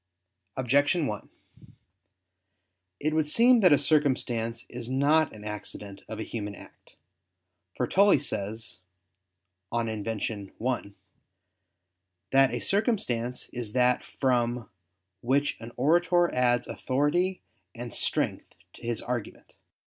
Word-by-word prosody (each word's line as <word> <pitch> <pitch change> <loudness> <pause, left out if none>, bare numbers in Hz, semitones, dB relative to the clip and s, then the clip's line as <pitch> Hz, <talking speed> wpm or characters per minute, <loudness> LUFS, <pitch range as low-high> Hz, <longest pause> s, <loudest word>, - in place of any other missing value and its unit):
Objection 145 +6 +3
1: 105 -6 -5 1.7
It 155 +1 0
would 155 -1 +1
seem 240 +7 +6
that 185 -6 +6
a 145 - +7
circumstance 120 -7 +1
is 120 -1 -7
not 145 +4 +3
an 105 -1 -11
accident 105 -1 -6
of 110 - -6
a - - -2
human 105 -3 -5
act. - - -16 0.8
For - - +1
Tully 200 -1 +5
says 110 -5 -4 0.9
(De 120 - -1
Invent. 110 -1 -2
Rhetor. 100 -3 -7 0.3
i) - - -22 1.4
that 135 0 +5
a - - -2
circumstance 130 - 0
is 120 -4 -5
that 125 0 +3
from 120 -3 -1 0.5
"which 140 +4 +1
an 115 +1 -9
orator 175 +5 +3
adds 120 -1 +2
authority 150 +8 0 0.3
and 120 -1 -7
strength - - -2 0.2
to - - -15
his 120 -1 -2
argument." 120 -3 -5
125 Hz, 115 wpm, -28 LUFS, 115-150 Hz, 1.7 s, a